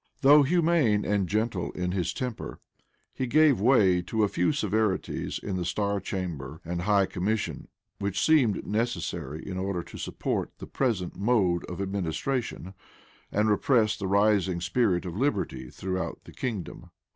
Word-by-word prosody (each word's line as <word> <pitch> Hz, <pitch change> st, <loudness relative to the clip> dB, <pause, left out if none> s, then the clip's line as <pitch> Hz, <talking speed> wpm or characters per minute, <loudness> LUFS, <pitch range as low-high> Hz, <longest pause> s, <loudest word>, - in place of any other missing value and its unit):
Though 145 Hz, +2 st, +8 dB
humane 155 Hz, -8 st, +2 dB
and 100 Hz, -3 st, 0 dB
gentle 110 Hz, -3 st, -1 dB
in 90 Hz, 0 st, -2 dB
his 90 Hz, -2 st, -1 dB
temper, 125 Hz, -3 st, -5 dB, 0.5 s
he 130 Hz, -, -2 dB
gave 145 Hz, -4 st, +4 dB
way 100 Hz, -7 st, +4 dB
to 110 Hz, +5 st, -1 dB
a -, -, +4 dB
few 90 Hz, -2 st, +1 dB
severities 110 Hz, -7 st, -1 dB
in 95 Hz, -3 st, -4 dB
the 90 Hz, -, -2 dB
star 100 Hz, +4 st, -1 dB
chamber 80 Hz, -7 st, -5 dB
and 85 Hz, +1 st, -3 dB
high 100 Hz, +1 st, +3 dB
commission, 100 Hz, +4 st, -2 dB, 0.3 s
which 100 Hz, -1 st, -1 dB
seemed 135 Hz, -11 st, +3 dB
necessary 105 Hz, -, -3 dB
in 95 Hz, -1 st, -4 dB
order 95 Hz, -2 st, -2 dB
to -, -, -11 dB
support -, -, -3 dB
the -, -, -8 dB
present 110 Hz, -10 st, -1 dB
mode 100 Hz, -5 st, +2 dB
of 90 Hz, -, -7 dB
administration, 100 Hz, -, -3 dB, 0.6 s
and 105 Hz, +1 st, +2 dB
repress 110 Hz, 0 st, +3 dB
the 100 Hz, -, -4 dB
rising 100 Hz, -2 st, +2 dB
spirit 90 Hz, 0 st, +1 dB
of 90 Hz, -1 st, -5 dB
liberty 100 Hz, -, -1 dB
throughout 95 Hz, +6 st, -4 dB
the -, -, -13 dB
kingdom. 110 Hz, -, -5 dB
100 Hz, 150 wpm, -27 LUFS, 90-115 Hz, 0.6 s, Though